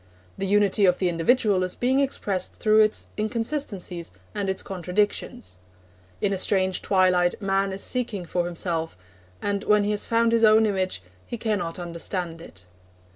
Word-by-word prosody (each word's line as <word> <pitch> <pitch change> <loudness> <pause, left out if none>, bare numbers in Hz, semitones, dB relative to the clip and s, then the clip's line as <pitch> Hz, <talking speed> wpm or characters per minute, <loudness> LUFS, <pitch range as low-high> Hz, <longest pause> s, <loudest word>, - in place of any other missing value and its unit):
The 195 - -3
unity 205 0 +3
of 180 - +3
the 185 - +1
individual 195 +3 +2
is 185 0 -2
being 260 +2 +1
expressed 205 -9 -1
through 215 0 +3
its 215 0 +2
inconsistencies 215 - -3 0.2
and 200 -1 -2
its 190 - -2
contradictions. 180 - -2 0.6
In 200 - +1
a 190 - -2
strange 190 -2 +1
twilight 185 -2 +2
man 195 -1 0
is 190 +1 -2
seeking 235 -7 -1
for 175 +1 -1
himself, 165 - -3 0.5
and 200 -1 -1
when 210 -1 +3
he 205 - 0
has 210 - -1
found 230 0 +2
his 230 0 +2
own 220 0 +6
image, 185 - -1 0.2
he 235 - -5
cannot 205 -7 -2
understand 170 -1 -4
it. 95 - -11
195 Hz, 160 wpm, -25 LUFS, 180-215 Hz, 0.6 s, own